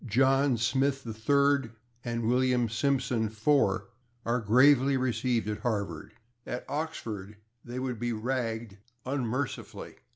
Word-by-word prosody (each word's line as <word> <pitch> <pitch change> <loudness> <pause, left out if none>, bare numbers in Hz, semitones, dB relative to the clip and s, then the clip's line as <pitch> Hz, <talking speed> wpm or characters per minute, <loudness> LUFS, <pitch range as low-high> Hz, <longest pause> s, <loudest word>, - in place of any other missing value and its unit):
John 135 +3 +3
Smith 135 +4 +1
/3rd/ 140 +2 +1 0.3
and 115 -2 -2
William 125 0 +2
Simpson 125 -1 0
/IV/ 110 -3 +2 0.4
are 120 +1 0
gravely 135 +5 +5
received 125 -3 0
at 105 -1 -3
Harvard; 100 -9 -3 0.3
at 125 - -5
Oxford 110 -10 -5 0.3
they 120 +1 -7
would 130 -3 -3
be 120 0 -1
ragged 115 -3 -3 0.3
unmercifully. 130 0 -3
120 Hz, 110 wpm, -29 LUFS, 110-135 Hz, 0.4 s, gravely